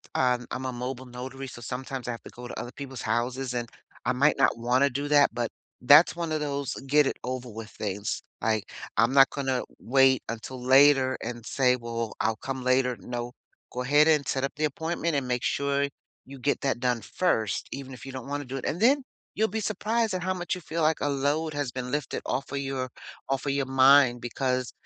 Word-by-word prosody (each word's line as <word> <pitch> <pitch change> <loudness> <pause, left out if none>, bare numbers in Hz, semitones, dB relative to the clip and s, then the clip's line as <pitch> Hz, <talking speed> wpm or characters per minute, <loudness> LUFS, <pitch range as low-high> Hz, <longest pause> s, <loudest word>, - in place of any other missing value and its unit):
um, 125 -1 +2
I'm 130 +1 -4
a 130 - -1
mobile 125 +1 -5
notary, 130 +2 -7
so 120 -1 -10
sometimes 130 +1 -5
I - - -1
have 115 - -7
to - - -10
go 120 0 -9
to - - -6
other 120 - -6
people's 135 -4 -7
houses, 125 +3 -1
and 120 -1 -3 0.4
I 125 - +2
might 140 +4 +3
not 135 - +3
wanna 125 +4 +2
do 140 +3 -3
that, 145 -1 +6
but 120 -1 -1 0.3
that's 145 +7 +7
one 170 -2 -3
of 155 - 0
those 140 -2 -2
get-it-over-with 125 -6 0
things; 100 0 -4 0.2
like, 110 -3 0 0.3
I'm 115 +3 +4
not 135 -1 +7
gonna 135 -3 -1 0.2
wait 135 0 +4
until 115 +3 -6
later 135 0 +5
and 120 -2 -6
say, 125 0 +3
"Well, 115 -2 -4
I'll 110 0 0
come 130 +1 -5
later," 130 -2 +2
no, 120 +4 -5 0.4
go 125 - -3
ahead 145 +4 +5
and 150 -4 +3
set 135 0 -1
up 135 - -1
the 155 +1 0
appointment 160 +2 -2
and 135 -3 -1
make 125 -1 -1
sure 140 0 +1 0.4
you 140 0 -10
get 140 +3 0
that 135 -3 0
done 125 -2 0
first 110 - 0
even 135 -1 -7
if 125 - -12
you 135 - -7
don't 130 0 -7
wanna 145 0 -3
do 130 +2 -6
it, - - -6
and 170 - -2
then 270 +4 +4 0.3
you'll 220 +1 +2
be 220 +3 -3
surprised 215 +1 0
at 185 - -2
how 185 0 0
much 175 +1 -2
you 180 - -8
feel 165 +1 -3
like 155 0 +2
a 145 - +1
load 145 +3 0
has 145 -4 -2
been 125 -1 -5
lifted 145 -3 -2
off 135 - -2
of 140 - -2
your 135 -2 -3 0.4
off 135 +1 -1
of - - +2
your 140 -1 0
mind 130 -2 +5
because 125 +1 -1
130 Hz, 215 wpm, -27 LUFS, 125-145 Hz, 0.4 s, that's